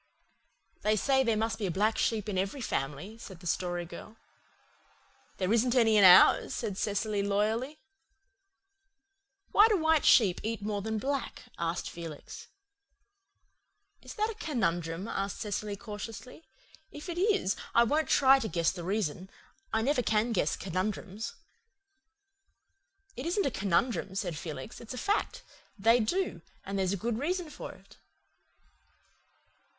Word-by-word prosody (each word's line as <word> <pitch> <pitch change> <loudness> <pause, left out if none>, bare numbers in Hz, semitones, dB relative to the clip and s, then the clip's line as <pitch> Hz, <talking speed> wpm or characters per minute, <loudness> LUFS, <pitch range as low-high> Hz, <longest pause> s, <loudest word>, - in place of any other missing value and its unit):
"They 215 +1 +2
say 265 +5 +2
there 230 -3 +1
must 225 +1 -1
be 205 - -1
a 175 - -4
black 215 +2 +2
sheep 220 -2 0
in 205 - -3
every 195 +8 -1
family," 170 - -4
said 190 -6 -10
the 180 - -14
Story 175 0 -1
Girl. 215 +5 -11 1.2
"There 190 +2 0
isn't 240 +2 +2
any 225 -3 +4
in 205 - +6
ours," 180 -1 +7
said 215 -5 -3
Cecily 205 +1 -1
loyally. 215 +8 0 1.7
"Why 420 +2 +7
do 430 -3 +2
white 320 -2 +3
sheep 195 -7 +5
eat 220 -1 -3
more 205 -1 -2
than 220 +2 -2
black?" 275 +4 -3 0.2
asked 170 +1 -2
Felix. 165 -3 -9 1.5
"Is - - -10
that 435 0 0
a - - -7
conundrum?" 180 - -2
asked 195 -2 -3
Cecily 210 0 -3
cautiously. 210 +5 -8 0.5
"If 295 +4 -9
it 345 0 -4
is 395 - +2 0.2
I 235 - +7
won't 300 +6 +1
try 270 0 +6
to 225 - -3
guess 170 -5 +1
the 175 -2 -7
reason. 190 -1 -2 0.4
I 220 0 +1
never 270 0 +2
can 220 0 +1
guess 175 -8 +1
conundrums." 195 - -4 1.8
"It 260 +6 -5
isn't 385 +3 +1
a 275 - +1
conundrum," 200 0 0
said 180 -4 -2
Felix. 150 -4 -7
"It's 235 +2 -8
a - - -7
fact. 410 - -1 0.3
They 225 +4 +4
do 230 - -1 0.2
and 195 0 -3
there's 190 -1 +1
a - - -1
good 225 +4 -2
reason 340 +2 -2
for - - -8
it." - - -19
215 Hz, 145 wpm, -30 LUFS, 190-255 Hz, 1.8 s, ours